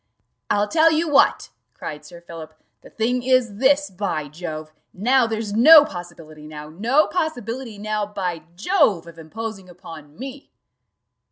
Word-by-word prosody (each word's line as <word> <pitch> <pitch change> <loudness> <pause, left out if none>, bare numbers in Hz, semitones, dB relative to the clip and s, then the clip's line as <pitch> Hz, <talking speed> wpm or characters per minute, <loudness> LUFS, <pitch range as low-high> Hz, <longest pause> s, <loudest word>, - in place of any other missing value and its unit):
"I'll 205 0 +1
tell 320 +5 +4
you 320 +2 +1
what," 285 -2 +3 0.2
cried 150 -1 -7
Sir 170 -1 -13
Philip, 165 -2 -11 0.3
"the - - -15
thing 245 +3 -1
is 245 -4 +1
this: 280 +3 +2
by 180 -6 -3
Jove! 155 -1 -7 0.2
now, 245 +5 +2
there's 220 -2 -4
no 295 +7 +8
possibility 165 - -10
now 150 0 -9
no 235 - +2
possibility 250 - -4
now, 210 0 -2
by 180 -5 -4
Jove! 200 - +2
of 165 -1 -13
imposing 195 +3 -7
upon 165 -5 -13
me." 270 +4 -9
205 Hz, 145 wpm, -22 LUFS, 170-255 Hz, 0.3 s, no